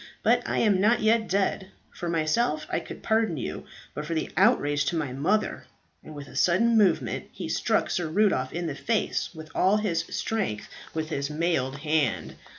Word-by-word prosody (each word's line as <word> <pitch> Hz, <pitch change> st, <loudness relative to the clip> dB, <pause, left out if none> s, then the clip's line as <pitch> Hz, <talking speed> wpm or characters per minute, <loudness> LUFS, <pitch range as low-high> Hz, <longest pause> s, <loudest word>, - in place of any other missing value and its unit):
But -, -, +4 dB
I -, -, 0 dB
am 200 Hz, -4 st, +3 dB
not 225 Hz, +4 st, +3 dB
yet 220 Hz, 0 st, +3 dB
dead. 195 Hz, 0 st, 0 dB, 0.2 s
For 175 Hz, -, -5 dB
myself, 170 Hz, -, +1 dB
I -, -, +1 dB
could -, -, -10 dB
pardon 220 Hz, -7 st, +1 dB
you; 125 Hz, -, -5 dB, 0.3 s
but 150 Hz, -, -4 dB
for 165 Hz, +2 st, -3 dB
the 160 Hz, -, -2 dB
outrage 145 Hz, -9 st, +3 dB
to -, -, -1 dB
my 145 Hz, -6 st, -2 dB
mother 185 Hz, +11 st, 0 dB, 0.2 s
" -, -, -42 dB
and 155 Hz, -, -11 dB
with 145 Hz, -1 st, -8 dB
a -, -, -13 dB
sudden 230 Hz, +7 st, +3 dB
movement 200 Hz, -6 st, +2 dB
he -, -, -6 dB
struck -, -, 0 dB
Sir 175 Hz, -2 st, -1 dB
Rudolph 200 Hz, +6 st, +2 dB
in 175 Hz, 0 st, -3 dB
the 160 Hz, -, -2 dB
face 220 Hz, +9 st, -1 dB
with 155 Hz, 0 st, -10 dB
all 195 Hz, +3 st, +3 dB
his 180 Hz, -6 st, 0 dB
strength, 195 Hz, -, -2 dB, 0.3 s
with 155 Hz, -1 st, -2 dB
his 140 Hz, -3 st, -2 dB
mailed 150 Hz, -4 st, 0 dB
hand. 150 Hz, -6 st, 0 dB
170 Hz, 190 wpm, -26 LUFS, 155-210 Hz, 0.3 s, But